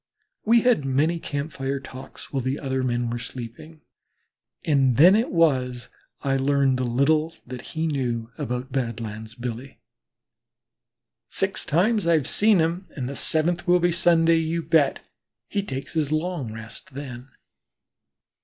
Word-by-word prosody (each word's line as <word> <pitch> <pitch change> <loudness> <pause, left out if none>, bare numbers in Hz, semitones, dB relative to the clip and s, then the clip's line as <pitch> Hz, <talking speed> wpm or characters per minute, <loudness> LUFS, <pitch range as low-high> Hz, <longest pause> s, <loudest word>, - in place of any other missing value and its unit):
We 230 +2 +5
had 245 - +3
many 145 +6 +1
camp 145 0 -4
fire 135 0 -3
talks 130 +1 -11
while 135 - 0
the 130 +3 -1
other 130 -1 -2
men 120 -2 -1
were 120 - -3
sleeping, 130 +7 -9 0.8
and 135 -6 +3
then 175 +7 +8
it 225 +3 +1
was 130 -8 +1 0.3
I 135 -1 +1
learned 135 -1 +2
the - - 0
little 155 +6 +1
that 125 0 -7 0.2
he 160 - +1
knew 120 -6 -2
about 125 +3 -4
Badlands 110 -3 -4
Billy. 125 +3 -6 1.5
"Six - - -1
times 205 +5 +2
have 165 -2 +4
I - - -7
seen 210 - +4
him 170 +3 0
and 130 -5 -3
the 140 - -5
seventh 170 +5 +1
will 180 0 +5
be 175 0 +2
Sunday, 165 -1 +4
you 165 +1 -1
bet. 150 -4 +2 0.5
He 200 - -1
takes 135 -8 -6
his 155 -3 0
long 155 -6 -2
rest 110 +3 -9
then." 130 -2 -7
140 Hz, 150 wpm, -24 LUFS, 125-165 Hz, 1.5 s, then